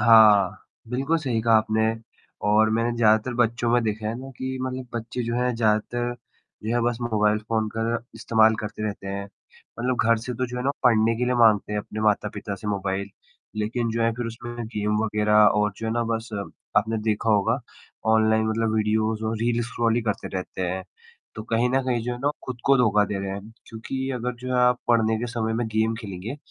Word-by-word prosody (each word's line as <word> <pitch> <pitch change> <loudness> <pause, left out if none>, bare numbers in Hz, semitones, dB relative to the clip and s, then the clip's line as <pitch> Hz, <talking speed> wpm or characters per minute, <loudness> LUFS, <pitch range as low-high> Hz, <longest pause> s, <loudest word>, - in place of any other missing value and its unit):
हाँ, 110 -5 +7 0.4
बिल्कुल 135 +7 0
सही 125 -7 -1
कहा 115 0 +3
आपने 110 0 +1 0.6
और 110 +1 +4
मैंने 115 +2 +1
ज़्यादातर 110 +1 +3
बच्चों 120 0 +1
में 120 0 +4
देखा 110 0 -2
है 110 - -2
ना 135 +1 -8
कि 130 0 -3
मतलब 130 0 -4
बच्चे 120 +2 -3
जो 115 0 -2
हैं 125 0 0
ज़्यादातर 120 +2 0 0.5
जो 110 +2 -1
है 120 - +2
बस 120 -1 -3
मोबाइल 105 -2 +2
फ़ोन 110 -1 0
का 115 - 0 0.3
इस्तेमाल 110 -1 +3
करते 105 0 -6
रहते 100 -1 -6
हैं, 100 +1 -4 0.5
मतलब 125 +1 0
घर 115 - +6
से 125 - -3
तो 130 +2 -1
जो 125 +1 -7
है 125 - -2
ना 140 - +3
पढ़ने 115 -2 +4
के 125 - 0
लिए 125 0 +1
माँगते 110 -3 +4
हैं 105 - 0
अपने 105 +1 -7
माता-पिता 105 -1 0
से 100 - -9
मोबाइल 100 -1 -2 0.5
लेकिन 115 +2 -1
जो 115 +1 -1
है 115 0 +2
फ़िर 120 0 -4
उसमें 120 0 -6
गेम 105 -1 -1
वगैरह 105 0 +1
और 105 0 +4
जो 110 - -5
है 110 - -1
ना 120 - +1
बस 115 +1 -5 0.5
आपने 110 +2 +2
देखा 110 +1 0
होगा 100 -2 +2 0.5
ऑनलाइन 110 0 +3
मतलब 110 0 0
वीडियोज़ 110 0 0
और 110 +1 -1
रील्स 120 +1 0
स्क्रॉल 115 -2 0
ही 120 - +1
करते 105 -2 -2
रहते 95 0 -5
हैं, 95 +1 -3 0.5
तो 110 - -5
कहीं 115 +2 +1
न 135 - +2
कहीं 120 -3 0
जो 125 +1 -2
है 120 - -5
ना 135 - -3
वो 145 - +3
खुद 130 -1 -5
को 140 0 +5
धोखा 105 -4 +4
दे 105 -1 -3
रहे 95 - -3
हैं 100 +3 -7 0.2
क्योंकि 130 +4 -5
अगर 125 0 -3
जो 125 - -6
है 125 - +1
आप 125 0 +4
पढ़ने 110 -2 +3
के 120 - -3
समय 115 -2 -1
में 115 0 -1
गेम 110 +1 +1
खेलेंगे 105 +4 -6
115 Hz, 215 wpm, -24 LUFS, 105-120 Hz, 0.6 s, हाँ